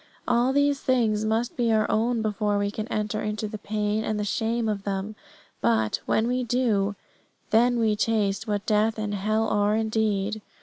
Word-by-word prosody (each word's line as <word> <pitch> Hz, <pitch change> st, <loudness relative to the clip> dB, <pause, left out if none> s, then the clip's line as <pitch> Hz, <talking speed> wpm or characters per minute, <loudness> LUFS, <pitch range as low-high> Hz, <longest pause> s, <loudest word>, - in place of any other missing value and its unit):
All 240 Hz, +2 st, +3 dB
these 285 Hz, 0 st, +2 dB
things 220 Hz, -5 st, +1 dB
must 225 Hz, +2 st, 0 dB
be 235 Hz, -2 st, +1 dB
our 215 Hz, -1 st, +3 dB
own 230 Hz, +1 st, +1 dB
before 210 Hz, -1 st, 0 dB
we 200 Hz, 0 st, 0 dB
can 215 Hz, +1 st, -5 dB
enter 215 Hz, -1 st, -2 dB
into 215 Hz, 0 st, -3 dB
the 210 Hz, 0 st, -7 dB
pain 210 Hz, +1 st, -1 dB
and 215 Hz, -1 st, -2 dB
the -, -, -1 dB
shame 225 Hz, +3 st, -1 dB
of 205 Hz, -2 st, -2 dB
them; 200 Hz, +2 st, -3 dB, 0.5 s
but, 110 Hz, -2 st, +1 dB
when 220 Hz, -, +2 dB
we 250 Hz, +1 st, 0 dB
do, 220 Hz, -5 st, +1 dB, 0.6 s
then 240 Hz, +2 st, +4 dB
we 220 Hz, -2 st, +2 dB
taste 210 Hz, 0 st, 0 dB
what 205 Hz, -1 st, -2 dB
death 215 Hz, +1 st, +2 dB
and 210 Hz, -1 st, -3 dB
hell 215 Hz, +3 st, 0 dB
are 205 Hz, 0 st, +2 dB
indeed. 215 Hz, -1 st, 0 dB
215 Hz, 180 wpm, -25 LUFS, 210-225 Hz, 0.6 s, then